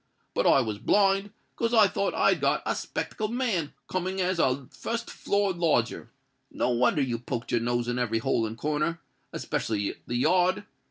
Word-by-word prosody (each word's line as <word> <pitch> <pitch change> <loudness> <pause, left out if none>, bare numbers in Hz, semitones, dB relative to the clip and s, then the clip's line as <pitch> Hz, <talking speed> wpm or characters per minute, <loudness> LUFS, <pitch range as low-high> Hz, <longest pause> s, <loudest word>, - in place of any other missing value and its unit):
But - - +1
I 135 - +6
was 110 -4 -3
blind, 195 - +3 0.3
'cause 230 +1 0
I 215 -2 +7
thought 200 +1 -1
I'd - - +3
got - - +1
a - - 0
'spectable 215 -1 -3
man 225 - -1 0.2
coming 185 +1 -2
as 185 -1 0
a 130 -2 +1
fust 230 0 -4
floor 200 -1 0
lodger. 150 -9 0 0.4
No - - -1
wonder 125 +4 +2
you 120 -3 -2
poked 120 0 -5
your 120 - +2
nose 120 0 0
in 120 0 -1
every 115 -2 0
hole 115 0 0
and 110 +1 -7
corner—'specially 150 -8 -3
the 120 - -3
yard. 180 +8 +2
155 Hz, 170 wpm, -27 LUFS, 120-195 Hz, 0.4 s, I